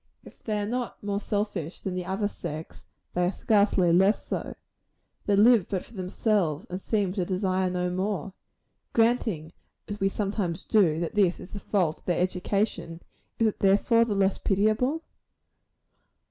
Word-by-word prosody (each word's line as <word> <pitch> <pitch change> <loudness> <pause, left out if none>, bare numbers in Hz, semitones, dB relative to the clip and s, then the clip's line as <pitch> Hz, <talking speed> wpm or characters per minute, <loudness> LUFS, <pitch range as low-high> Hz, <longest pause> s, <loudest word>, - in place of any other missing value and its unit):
If - - -16
they 215 -2 -2
are 205 - -1
not 245 +1 -4
more 200 0 -1
selfish 205 -6 -3
than 190 - -3
the 180 -1 -3
other 195 +2 0
sex, 160 -5 -8 0.3
they 180 - +1
are - - +1
scarcely 200 -4 +3
less 190 +4 +3
so. - - -4 0.7
They 205 - +4
live 220 -1 +5
but 190 -3 -2
for - - -18
themselves, 185 -3 0
and 185 +2 -4
seem 200 -4 0
to 190 -2 -1
desire 185 0 0
no 180 0 -1
more. 190 -1 -2 0.6
Granting, 225 -9 +1 0.3
as 205 0 -5
we 195 -1 +2
sometimes 195 -4 -2
do, 175 -8 +3
that 170 - -3
this 195 -4 +2
is - - -10
the 205 - -5
fault 180 -7 0
of - - -30
their 175 - 0
education, 180 -1 -1 0.4
is 225 - +2
it 215 - 0
therefore 205 +4 +4
the 220 -3 -1
less 195 -1 +2
pitiable? 215 - +1
195 Hz, 165 wpm, -27 LUFS, 180-210 Hz, 0.7 s, live